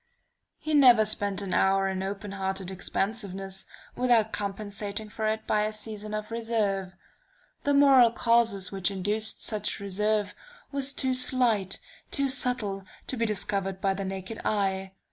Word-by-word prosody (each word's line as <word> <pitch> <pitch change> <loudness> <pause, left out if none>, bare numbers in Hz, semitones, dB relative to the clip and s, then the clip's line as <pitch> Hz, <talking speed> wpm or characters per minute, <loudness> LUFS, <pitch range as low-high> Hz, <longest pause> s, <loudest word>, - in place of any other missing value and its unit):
"He 310 0 -4
never 250 -7 +7
spent 205 -1 -1
an 190 - -4
hour 195 0 +3
in 190 -1 -2
open 195 +1 -5
hearted 190 -1 -3
expansiveness, 195 0 -3 0.3
without 235 -3 +2
compensating 205 +1 -4
for 215 0 -3
it 220 0 -1
by 210 - +2
a 215 - -2
season 215 0 -6
of 215 +1 -5
reserve. 210 -5 -1 0.7
The 285 0 +3
moral 270 -4 +7
causes 230 -5 +2
which 195 -1 0
induced 205 +3 0
such 210 -2 -1
reserve 205 +1 0 0.4
were 280 -1 -2
too 265 -1 +1
slight, 245 -6 +2 0.3
too 275 -1 +1
subtle, 245 -7 0 0.2
to - - -2
be 230 -1 0
discovered 195 -2 -1
by 195 0 +1
the 195 +1 -4
naked 190 +3 -5
eye. 195 -2 -1
210 Hz, 145 wpm, -27 LUFS, 195-230 Hz, 0.7 s, never